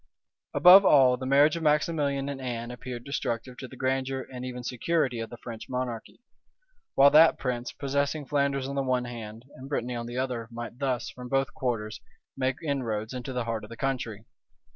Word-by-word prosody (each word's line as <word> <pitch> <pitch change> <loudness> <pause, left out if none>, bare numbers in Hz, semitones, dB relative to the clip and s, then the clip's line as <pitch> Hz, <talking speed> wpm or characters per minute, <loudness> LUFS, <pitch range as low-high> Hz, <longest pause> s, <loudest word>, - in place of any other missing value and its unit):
Above 185 +3 +9
all, 130 -8 +6
the 130 +1 -6
marriage 145 +4 +5
of 170 - -4
Maximilian 150 -2 +1
and 140 -1 -5
Anne 120 -2 -4
appeared 125 -1 -7
destructive 125 -3 -3
to 130 - -7
the 130 - -12
grandeur 130 0 -1
and 125 0 -6
even 125 -1 -6
security 125 0 0
of 115 - -4
the 120 - -9
French 115 -2 -9
monarchy; 125 - -5 0.7
while 140 +1 +7
that 160 +2 +7
prince, 125 -2 -3
possessing 140 +2 -1
Flanders 140 -1 0
on 140 - -4
the 140 - 0
one 130 -2 0
hand, 115 -1 -8
and 130 +2 -11
Brittany 125 -4 -2
on 120 -1 -4
the 120 +1 -6
other, 125 -3 -2
might 120 +1 -8
thus, 130 -3 -1
from 125 -1 -9
both 135 0 0
quarters, 110 -4 -3 0.3
make 130 -1 0
inroads 120 -7 -2
into 125 +1 -5
the 125 -2 -2
heart 115 -2 -3
of 105 - -10
the 115 - -9
country. 115 -5 -3
130 Hz, 190 wpm, -27 LUFS, 120-140 Hz, 0.7 s, Above